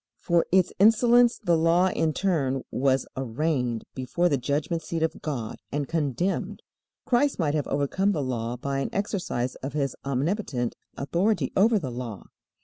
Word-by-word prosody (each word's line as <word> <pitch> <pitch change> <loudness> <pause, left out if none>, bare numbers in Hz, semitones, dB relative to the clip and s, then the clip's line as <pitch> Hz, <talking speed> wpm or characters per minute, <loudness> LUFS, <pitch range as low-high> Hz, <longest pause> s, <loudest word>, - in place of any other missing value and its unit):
For 170 -1 +1
its 185 -1 +3
insolence 235 +3 +5
the 175 -6 +1
Law 165 +3 +3
in 160 -3 0
turn 145 -8 0
was 135 0 +1
arraigned 130 -2 -1
before 135 +7 0
the 140 - +2
judgment 145 +5 -1
seat 165 +1 -3
of 160 - -2
God 125 -8 -4
and 145 -1 -2
condemned. 160 +3 -1 0.4
Christ 270 +3 +2
might 150 -5 0
have 150 -2 -1
overcome 145 +8 +1
the 155 -7 -1
Law 120 -2 -3
by 135 +2 -2
an 135 - -2
exercise 180 - -2
of 135 +1 -6
His 140 -2 -1
omnipotent 140 - -1 0.2
authority 170 +1 0
over 220 +3 +4
the 140 -10 -3
Law. 120 -4 -6
150 Hz, 155 wpm, -26 LUFS, 130-185 Hz, 0.4 s, insolence